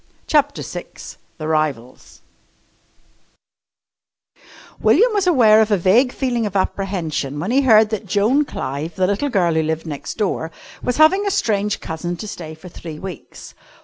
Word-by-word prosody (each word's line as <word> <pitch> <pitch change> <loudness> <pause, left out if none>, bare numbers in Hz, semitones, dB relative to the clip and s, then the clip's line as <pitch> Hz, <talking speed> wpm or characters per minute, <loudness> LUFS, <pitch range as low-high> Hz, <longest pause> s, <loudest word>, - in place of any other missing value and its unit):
CHAPTER 290 -1 +1
VI - - -6 0.5
THE 155 - -5
RIVALS 150 -6 -3 2.6
William 475 0 +4
was 400 -3 +1
aware 225 -10 +6
of 220 - +1
a 205 - +3
vague 220 +9 +3
feeling 240 -5 -1
of 200 - -8
apprehension 175 -8 -2
when 185 +9 -2
he 270 +3 +4
heard 220 -4 +5
that 215 -1 -4
Joan 215 +9 +2
Clive, 155 - -5
the 185 - +1
little 205 +9 0
girl 180 -8 +1
who 160 - +2
lived 160 +1 -2
next 145 -2 -6
door, 195 -6 -1 0.3
was 250 - -2
having 380 +7 +4
a - - +3
strange 210 - 0
cousin 175 +2 -4
to 215 - -7
stay 160 -5 -8
for 160 +4 -13
three 165 -3 -9
weeks. 185 -2 -9
195 Hz, 155 wpm, -20 LUFS, 160-245 Hz, 2.6 s, aware